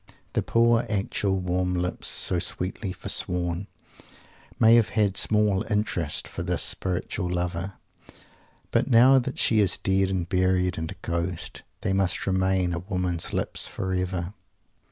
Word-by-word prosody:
The - - +1
poor, 115 0 +3
actual, 100 -1 0
warm 90 0 -1
lips, 90 0 -2
"so 90 - 0
sweetly 95 +3 -2
forsworn," 90 +1 -2 0.9
may 115 +1 +6
have 115 -2 +5
had 100 -3 +1
small 105 -1 +2
interest 95 -7 -1
for - - -6
this 90 -2 0
"spiritual" 90 0 -2
lover, 90 +1 -2 1.0
but - - +1
now 130 +2 +7
that 130 +1 -4
she 110 - +3
is 100 -3 +3
dead 95 0 +1
and 90 -3 -2
buried, 90 -1 +1
and 80 0 -4
a - - -8
ghost, 85 +1 -3 0.2
they 95 - 0
must 95 -1 +1
remain 95 -1 +1
a 85 - -2
woman's 90 -2 -2
lips - - -1
forever! 90 -1 -3
95 Hz, 140 wpm, -26 LUFS, 90-100 Hz, 1.0 s, now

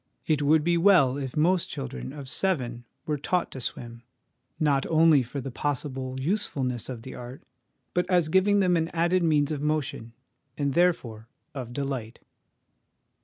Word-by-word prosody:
It 155 -2 +1
would 150 +1 +4
be 170 +1 +2
well 170 -9 +5
if 135 -2 -5
most 175 +3 +2
children 65 0 -5
of 140 -3 -9
seven 125 -8 -1 0.2
were 150 -2 -2
taught 180 +5 -1
to 130 - -7
swim, 115 0 -5 0.6
not 140 -3 +2
only 160 -3 +5
for 125 +3 -5
the 135 - -6
possible 130 -1 -3
usefulness 135 - -2
of 120 -3 -6
the 130 - -8
art, 125 +2 -9 0.5
but 180 - 0
as 175 -4 +3
giving 195 +4 +3
them 180 -2 +3
an 165 -1 +1
added 175 +2 +2
means 155 -3 +2
of 145 -2 -3
motion, 150 -6 -2 0.4
and, 140 -2 0
there 175 +3 +5
fore, 110 -5 -11 0.3
of 130 -4 -6
delight. 130 -4 -4
145 Hz, 165 wpm, -26 LUFS, 130-165 Hz, 0.6 s, well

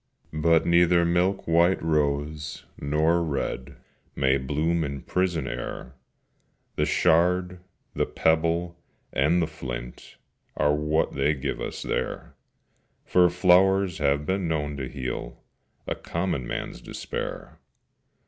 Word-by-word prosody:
But 80 +1 +3
neither 85 0 +4
milk 90 +3 +1
white 85 +3 +4
rose 75 0 -1
nor 80 +4 +2
red 70 -3 -3 0.4
May 65 0 +2
bloom 75 +5 0
in 70 -3 -5
prison 90 -6 -1
air; 65 - -6 0.8
The - - +1
shard, 90 +2 +2 0.3
the - - 0
pebble, 85 +2 +1 0.4
and 80 +6 +3
the - - +2
flint, 60 -6 -8 0.4
Are 75 - +3
what 75 +1 0
they 70 +2 +1
give 70 0 -4
us - - -5
there: - - -3 0.7
For 90 -1 +4
flowers 90 +1 +3
have 70 0 +1
been 95 0 -1
known 75 -2 -1
to 65 -2 -4
heal 65 -3 -6 0.4
A - - -1
common 85 -8 -3
man's - - -5
despair. - - -6
80 Hz, 120 wpm, -26 LUFS, 70-85 Hz, 0.8 s, neither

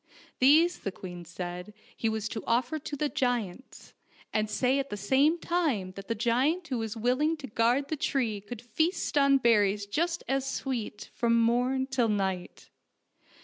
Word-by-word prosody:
These 315 +7 +5
the 195 - -4
queen 175 -3 -9
said 180 +4 -7 0.2
he 225 - 0
was 220 -1 -2
to 220 - -5
offer 250 +6 +1
to 290 0 -6
the 295 +1 0
giants, 245 -4 -3 0.4
and 215 -1 0
say 255 +5 +1
at 275 0 -3
the 205 - -4
same 270 - +3
time 310 - -1
that 195 +1 -10
the 230 - -1
giant 265 - +1
who 255 -3 -1
was 225 0 -4
willing 255 +8 +1
to 295 - -8
guard 245 +4 +1
the 315 - 0
tree 235 -8 -1
could 215 +3 -9
feast 315 - -1
on 275 -1 +5
berries 210 -5 +3
just 335 +11 -1
as 270 0 0
sweet 260 -5 -4
from 235 -1 +2
morn 250 +3 +2
till 260 -4 0
night. 190 -3 -3
245 Hz, 170 wpm, -29 LUFS, 210-275 Hz, 0.4 s, These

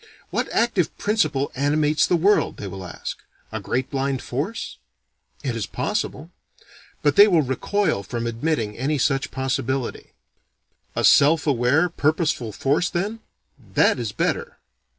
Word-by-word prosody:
What - - -1
active 225 -8 +1
principle 155 -10 0
animates 150 +3 +2
the 180 - +3
world, 195 +5 +2
they - - -6
will 95 -1 -7
ask. 90 - -6 0.3
A 110 - -3
great 125 +5 -2
blind 135 -1 -1
force? 155 - -4 0.6
It 125 -4 -2
is 110 -4 -3
possible. - - -3 0.7
But 145 -1 +2
they 205 - +10
will 170 -6 +4
recoil 155 - 0
from 115 +4 -4
admitting 115 -2 -1
any 145 +5 -1
such 135 +1 +1
possibility. 130 -1 -3 0.8
A - - -1
self 150 +2 +5
aware 140 +4 +3
purposeful 155 -7 0
force 145 - +1
then? 205 +6 -2 0.6
That - - +4
is - - -3
better! 475 0 -2
145 Hz, 135 wpm, -23 LUFS, 125-170 Hz, 0.8 s, they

